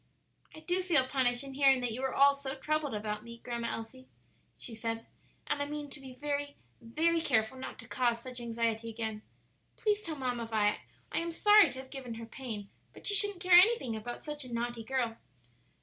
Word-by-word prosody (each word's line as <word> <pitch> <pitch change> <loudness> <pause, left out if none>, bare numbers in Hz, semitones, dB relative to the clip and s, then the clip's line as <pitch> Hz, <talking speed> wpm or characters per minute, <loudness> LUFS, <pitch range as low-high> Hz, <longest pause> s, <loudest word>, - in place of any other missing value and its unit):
"I 315 - -10
do 355 +3 0
feel 340 -8 +5
punished 255 -1 +3
in 275 -1 -8
hearing 270 -1 +5
that 245 -2 -1
you 240 +4 -4
were 265 -1 -1
all 280 +1 +7
so 280 -1 -5
troubled 305 -5 -1
about 210 0 -3
me, 235 0 -10
Grandma 235 -1 -4
Elsie," 255 +3 -6 0.5
she 235 - -5
said, 225 0 -3 0.4
"and 290 -1 -1
I 285 - -1
mean 295 -1 -5
to 295 - -5
be 260 -2 -10
very, 285 +1 -3 0.3
very 325 +9 +1
careful 220 -5 +1
not 260 - -7
to 230 - -11
cause 240 -2 +1
such 250 +1 -6
anxiety 230 -1 -1
again. 220 -1 -4 0.6
Please 420 -1 +1
tell 330 -6 -4
Mamma 245 -4 -2
Vi 210 -2 +1 0.3
I - - +1
am 335 0 -2
sorry 415 +1 +6
to 260 - -7
have 265 - -16
given 255 -4 -6
her 230 0 -7
pain; 225 -4 -7 0.2
but - - -13
she 410 - +3
shouldn't 405 -3 +1
care 365 -1 +3
anything 365 - +3
about 240 +3 -6
such 295 -1 -4
a 250 - -9
naughty 235 0 -3
girl." 235 -2 -1
260 Hz, 205 wpm, -32 LUFS, 230-295 Hz, 0.6 s, all